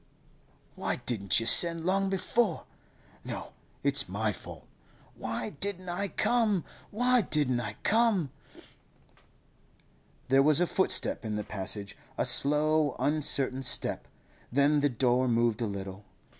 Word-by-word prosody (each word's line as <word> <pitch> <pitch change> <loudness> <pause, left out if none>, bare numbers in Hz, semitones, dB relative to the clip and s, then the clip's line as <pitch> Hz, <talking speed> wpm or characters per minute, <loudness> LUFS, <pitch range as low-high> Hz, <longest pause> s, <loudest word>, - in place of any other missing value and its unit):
'Why - - -2
didn't 100 -5 0
you 115 - -4
send 165 +6 +5
long 195 +1 +1
before? 195 +5 -1 0.6
No, - - -7 0.3
it's - - 0
my - - -1
fault. - - -11 0.5
Why 215 - -5
didn't 185 -3 -5
I 190 +3 -2
come? 215 -3 0 0.2
Why 245 +3 +2
didn't 145 - 0
I 120 - -5
come?' 215 - +2 2.0
There 135 +1 +4
was 150 +2 +3
a 180 - +3
footstep 190 -6 0
in 110 -2 -3
the 105 - -3
passage, 100 0 -4 0.2
a - - +1
slow, 150 0 +3
uncertain 140 -3 0
step; 130 - +1 0.4
then 140 +3 +3
the 145 0 +2
door 125 +1 +1
moved 115 -1 +1
a 115 - 0
little. 100 0 -7
145 Hz, 130 wpm, -29 LUFS, 120-190 Hz, 2.0 s, send